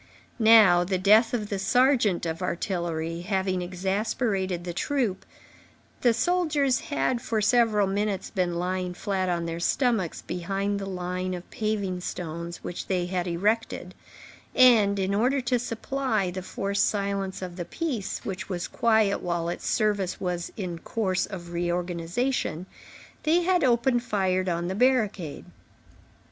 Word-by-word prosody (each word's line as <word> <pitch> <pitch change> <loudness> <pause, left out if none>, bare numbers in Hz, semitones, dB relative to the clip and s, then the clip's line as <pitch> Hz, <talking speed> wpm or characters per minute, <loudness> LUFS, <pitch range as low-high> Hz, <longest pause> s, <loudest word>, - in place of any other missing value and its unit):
Now, 215 -6 +7
the 185 +1 -1
death 210 +5 +5
of 215 -4 -2
the 200 - -2
sergeant 225 -3 +3
of 165 +1 -3
artillery 170 -2 -2
having 190 -1 -1
exasperated 190 0 -1
the 175 -1 -4
troop, 225 -4 -1 0.7
the 240 - +5
soldiers 295 -2 +1
had, 285 -6 -1
for 220 -1 -1
several 215 -2 +3
minutes, 200 0 -2
been 180 -2 0
lying 180 +1 -2
flat 190 -1 -1
on 170 -1 -1
their 165 0 -4
stomachs 220 - 0
behind 195 +3 -2
the 195 - -5
line 185 0 -3
of 175 - -9
paving 205 -4 -2
stones 170 0 -5
which 175 - -5
they 180 -2 0
had 180 0 -2
erected, 210 +7 -1 0.6
and, 220 -6 +6
in 195 0 0
order 250 +7 +2
to 245 0 +1
supply 230 -4 -1
the 185 +1 -5
forced 200 +2 0
silence 195 -2 -2
of 180 -1 -6
the 175 - -4
piece, 250 - -4
which 195 +1 -5
was 180 -2 -3
quiet 220 -4 +2
while 170 -1 -1
its 175 - -5
service 205 -5 0
was 175 -2 -3
in 180 -5 -4
course 190 -1 -1
of 175 -4 -8
reorganization, 175 +3 -1 0.6
they 325 +3 +3
had 360 -1 +2
opened 240 0 +3
fire 190 -5 0
on 170 0 -1
the 185 - -2
barricade. 215 - +1
195 Hz, 145 wpm, -26 LUFS, 180-225 Hz, 0.7 s, Now